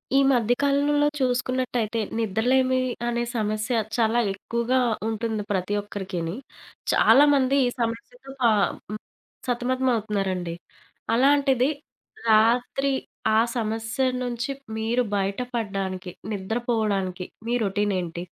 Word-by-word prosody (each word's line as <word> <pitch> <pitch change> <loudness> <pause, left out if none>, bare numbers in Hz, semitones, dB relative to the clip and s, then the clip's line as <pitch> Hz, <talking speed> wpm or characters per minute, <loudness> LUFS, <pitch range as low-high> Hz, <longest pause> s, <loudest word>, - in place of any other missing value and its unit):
ఈ - - +6
మధ్య 245 -2 +3
కాలంలో 290 +1 +3
చూసుకున్నట్టయితే 250 -3 0 0.2
నిద్రలేమి 250 +5 +2 0.3
అనే 240 0 0
సమస్య 215 +2 0 0.2
చాలా 230 0 +3
ఎక్కువగా 235 +5 -1 0.3
ఉంటుంది 220 -1 -2
ప్రతి 190 0 -1
ఒక్కరికిని. 190 -4 -4 0.6
చాలామంది 275 -1 +5
ఈ - - +2
సమస్యతో 235 - -4
పా 235 -2 +5 0.4
హ్మ్. 215 - -4 0.5
సతమతమవుతున్నారండి. 220 -8 -1 0.6
అలాంటిది, 270 0 +3 0.6
రాత్రి 245 +5 +3 0.4
ఆ - - +6 0.2
సమస్య 225 +2 -1 0.2
నుంచి 240 +1 -3 0.3
మీరు 230 +3 +1
బయటపడడనికి 195 -3 -3 0.2
నిద్రపోవడానికి 205 -3 -1 0.2
మీ 235 - 0
రొటీనేంటి? 190 -4 -1
230 Hz, 90 wpm, -25 LUFS, 205-255 Hz, 0.6 s, ఈ